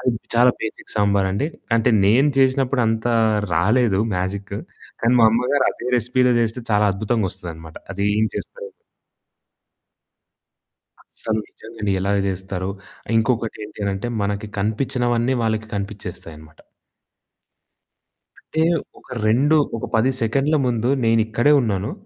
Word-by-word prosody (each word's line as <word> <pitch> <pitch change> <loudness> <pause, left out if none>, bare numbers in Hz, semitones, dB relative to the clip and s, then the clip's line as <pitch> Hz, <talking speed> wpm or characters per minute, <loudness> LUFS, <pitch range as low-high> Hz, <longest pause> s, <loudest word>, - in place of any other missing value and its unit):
అది 125 - +1 0.2
చాలా 120 +2 +6
బేసిక్ 110 - -6
సాంబారండి. 100 +4 +1 0.3
అంటే 115 +2 +2
నేను 125 +9 +4
చేసినప్పుడు 130 -1 +2
అంత 110 +1 -1 0.5
రాలేదు 105 +3 +2
మ్యాజిక్కు. 100 +2 -3 0.4
కానీ 115 +1 +3
మా 115 - +7
అమ్మగారదే 125 +1 0
రెసిపీ‌లో 125 +2 +2
చేస్తే 115 +2 -1
చాలా 105 0 +4
అద్భుతంగొస్తదన్నమాట. 90 -6 -4 0.2
అది 100 +1 -2
ఏం 110 - +3
చేస్తారు. 475 -1 -7 2.3
అసలు 110 -1 -4
నిజంగండి 110 -2 -6
ఎలాగ 100 +2 0
చేస్తారో. 95 0 -4 0.5
ఇంకొకటి 115 -1 0
ఏంటనంటే, 100 0 -4 0.2
మనకి 105 +1 -3
కనిపించినవన్నీ 120 +3 0
వాళ్ళకి 110 -1 -1
కనిపించేస్తాయన్నమాట. 85 -6 -8 1.8
అంటే, 160 - -4 0.4
ఒక - - -23 0.2
2 135 +8 +3 0.2
ఒక - - -4
10 120 +4 +3
సెకండ్ల 135 +7 +1
ముందు 120 0 0 0.2
నేనిక్కడే 115 +4 +3
ఉన్నాను. 105 -1 -2
110 Hz, 105 wpm, -21 LUFS, 100-125 Hz, 2.3 s, మా